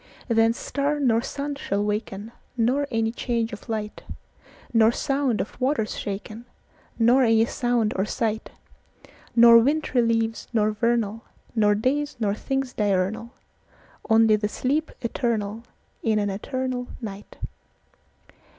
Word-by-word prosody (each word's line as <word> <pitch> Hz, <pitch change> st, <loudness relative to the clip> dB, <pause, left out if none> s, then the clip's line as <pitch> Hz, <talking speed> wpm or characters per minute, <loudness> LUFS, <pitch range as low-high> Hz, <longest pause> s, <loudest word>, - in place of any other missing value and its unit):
Then 225 Hz, -2 st, +4 dB
star 285 Hz, +4 st, -2 dB
nor 235 Hz, -5 st, +3 dB
sun 280 Hz, +3 st, -4 dB
shall 205 Hz, -7 st, -2 dB
waken, 210 Hz, 0 st, -3 dB, 0.3 s
Nor 260 Hz, +5 st, +1 dB
any 225 Hz, -2 st, 0 dB
change 235 Hz, -2 st, -2 dB
of 210 Hz, -, -10 dB
light:Nor 220 Hz, +1 st, -2 dB
sound 270 Hz, -3 st, 0 dB
of 215 Hz, -, -5 dB
waters 255 Hz, -5 st, 0 dB
shaken, 215 Hz, +3 st, -6 dB, 0.5 s
Nor 240 Hz, +3 st, +5 dB
any 225 Hz, -2 st, +4 dB
sound 240 Hz, -4 st, 0 dB
or 190 Hz, -, +1 dB
sight:Nor 230 Hz, +2 st, +1 dB
wintry 275 Hz, 0 st, +1 dB
leaves 225 Hz, -1 st, 0 dB
nor 215 Hz, -2 st, +2 dB
vernal, 225 Hz, -1 st, 0 dB, 0.3 s
Nor 210 Hz, -3 st, +3 dB
days 285 Hz, +7 st, 0 dB
nor 205 Hz, -3 st, +1 dB
things 270 Hz, +3 st, -3 dB
diurnal; 205 Hz, +2 st, 0 dB, 0.8 s
Only 220 Hz, -1 st, +5 dB
the 210 Hz, 0 st, -1 dB
sleep 290 Hz, +8 st, -1 dB
eternalIn 225 Hz, -2 st, -1 dB, 0.4 s
an 210 Hz, -2 st, +1 dB
eternal 255 Hz, +4 st, -3 dB
night. 205 Hz, -3 st, -8 dB
230 Hz, 115 wpm, -24 LUFS, 215-255 Hz, 0.8 s, Nor